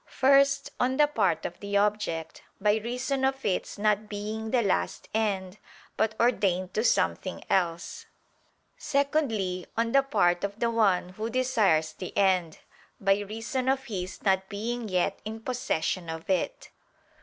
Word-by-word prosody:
First 275 +1 +3
on 260 +1 +1
the 295 - +6
part 195 - 0
of 175 - -5
the 200 0 -1
object; 200 -6 -1 0.2
by 210 +1 +3
reason 250 +4 -2
of 270 0 0
its 195 +1 -1
not 210 0 +1
being 215 +2 -4
the 240 0 +2
last 90 - -1
end, 200 -3 -1 0.4
but 220 0 0
ordained 190 -6 +1
to 215 - 0
something - - 0
else: 175 -3 -1 0.7
secondly 275 - 0
on 230 0 +1
the 275 - +5
part 175 -10 +1
of 200 +1 -3
the 235 -1 +1
one 200 -6 +2
who 215 +5 -5
desires 220 -11 +2
the 185 - -8
end, 185 -5 +2 0.4
by 195 0 +3
reason 225 +5 -3
of 265 0 +1
his 190 -6 -6
not 190 -1 +1
being 225 +2 -3
yet 180 -1 0
in 220 +1 -6
possession 195 -8 -2
of 160 0 -6
it. - - -2
210 Hz, 150 wpm, -28 LUFS, 185-245 Hz, 0.7 s, the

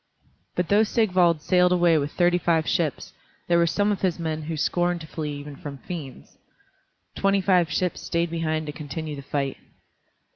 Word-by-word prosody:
But 180 -1 -1
though 205 +1 +5
Sigvald 180 -8 +2
sailed 180 +1 +4
away 175 -2 +4
with 145 +1 -3
thirty 175 0 +2
five 165 -2 +1
ships, 165 -7 -1 0.3
there 170 0 +4
were 170 - +3
some 205 +4 +1
of 200 - -2
his 185 -3 +1
men 160 -2 -3
who 155 +1 -4
scorned 175 +3 0
to 155 - -9
flee 150 -2 -4
even 145 0 -8
from 140 0 -8
fiends. 150 -4 -9 0.7
Twenty 195 0 +2
five 180 -3 +3
ships 180 -1 -1
stayed 170 0 -1
behind 160 -1 -1
to 150 - -4
continue 150 +1 -6
the 140 - -7
fight. 140 -1 -2
170 Hz, 180 wpm, -25 LUFS, 150-180 Hz, 0.7 s, though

